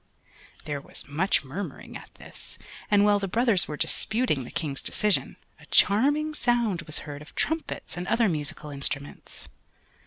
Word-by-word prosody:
There 145 -2 -3
was - - -7
much 155 +7 +1
murmuring 155 +10 -7
at - - -9
this, - - -10 0.3
and 205 -1 +5
while 205 -1 +4
the 195 - -2
brothers 225 -2 +3
were 150 - -5
disputing 205 - +1
the - - -9
King's 145 -5 -3
decision, 210 -2 +2 0.2
a - - -17
charming 290 +9 +3
sound 235 - +1
was 155 - -3
heard 145 -1 -7
of 150 - -14
trumpets 320 - -2
and 180 +1 -4
other 230 -1 +3
musical 150 -3 -3
instruments. 140 0 -2
190 Hz, 155 wpm, -26 LUFS, 150-230 Hz, 0.3 s, and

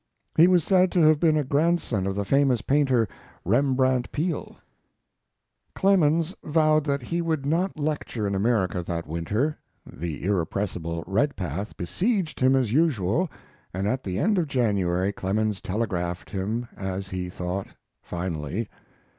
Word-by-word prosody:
He 165 +2 +7
was 180 -3 +4
said 185 +1 +3
to 180 - +3
have 155 -1 +5
been 155 -2 +3
a 150 - +1
grandson 140 - +1
of 95 - -2
the 100 0 -2
famous 135 -3 +2
painter, 130 -5 +2 0.4
Rembrandt 130 +2 +2
Peale. 160 +1 -3 1.2
Clemens 170 -3 +3
vowed 155 -1 +3
that 140 -3 -1
he 170 +7 -2
would 160 -4 -1
not 170 +5 0
lecture 145 -7 -2
in 100 - -1
America 95 -3 +1
that 85 -1 -4
winter. 105 - -1 0.3
The 80 -2 -6
irrepressible 85 -3 -2
Redpath 100 - -2
besieged 185 - -1
him 130 +1 +4
as 125 -5 +1
usual, 150 - +2 0.5
and 95 +2 -1
at 130 +4 -1
the 95 -1 -3
end 200 - +2
of 165 - 0
January 100 -8 +1
Clemens 105 +1 -1
telegraphed 90 -4 -3
him, 110 +5 -2
as 95 0 -4
he 90 -1 -4
thought, 90 +2 -4 0.3
finally. 85 +3 -4
120 Hz, 140 wpm, -25 LUFS, 95-155 Hz, 1.2 s, He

